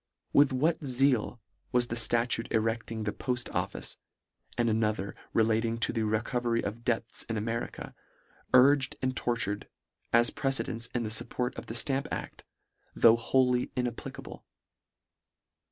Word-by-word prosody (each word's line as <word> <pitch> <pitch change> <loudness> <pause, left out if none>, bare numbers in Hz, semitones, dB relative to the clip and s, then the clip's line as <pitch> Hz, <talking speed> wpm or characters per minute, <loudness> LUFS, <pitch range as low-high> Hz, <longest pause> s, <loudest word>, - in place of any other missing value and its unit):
With 145 -1 +6
what 155 +6 +1
zeal 130 -3 +1 0.3
was 125 -1 +3
the 115 - -2
ftatute 115 0 +1
erecting 115 0 -1
the 105 0 -2
port 125 -2 -2
office, - - -3 0.6
and 120 - +2
another 110 -3 0 0.2
relating 115 +1 +1
to 115 - 0
the 115 - -1
reco 110 +3 0
very 115 -1 0
of 115 +4 -5
debts 115 -2 0
in 110 - -1
America, 115 +2 -4 0.6
urged 135 +1 +5
and 130 0 0
tortur 120 -4 0
ed, - - -15 0.4
as 120 0 +4
precedents 125 -4 0
in 120 - 0
thefupport 115 +3 -2
of - - -8
the 115 - -5
Stamp 135 +3 0
adl, - - -5 0.6
though 115 -1 +7
wholly 125 +1 +2
inapplicable. 125 -2 -5
120 Hz, 135 wpm, -29 LUFS, 115-125 Hz, 0.6 s, though